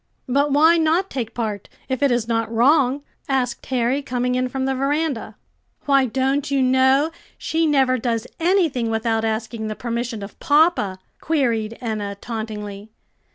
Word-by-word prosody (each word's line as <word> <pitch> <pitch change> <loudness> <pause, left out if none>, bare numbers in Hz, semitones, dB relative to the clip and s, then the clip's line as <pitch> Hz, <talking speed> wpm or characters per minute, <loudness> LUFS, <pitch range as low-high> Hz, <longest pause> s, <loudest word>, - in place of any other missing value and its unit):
"But 280 +3 +1
why 320 +4 +5
not 330 +4 +1
take 235 -5 -4
part, 215 -4 -3 0.2
if 260 0 -2
it 280 - +4
is 240 -2 0
not 225 -1 -1
wrong?" 270 +3 +3 0.3
asked 250 -3 -1
Harry, 255 +2 0
coming 250 -2 -1
in 255 0 0
from 265 +1 -2
the 270 - 0
veranda. 275 -4 -1 0.5
"Why, 275 -2 +4
don't 270 +4 0
you 280 -1 +1
know 265 +4 +3 0.3
she 325 0 0
never 265 -3 +3
does 230 -1 -1
anything 330 - +1
without 225 0 0
asking 220 0 -2
the 215 - -4
permission 235 -2 -4
of 200 - -10
papa?" 295 - +3 0.2
queried 230 -8 0
Enna 210 -4 -3
tauntingly. 210 -3 -6
250 Hz, 155 wpm, -21 LUFS, 225-280 Hz, 0.5 s, why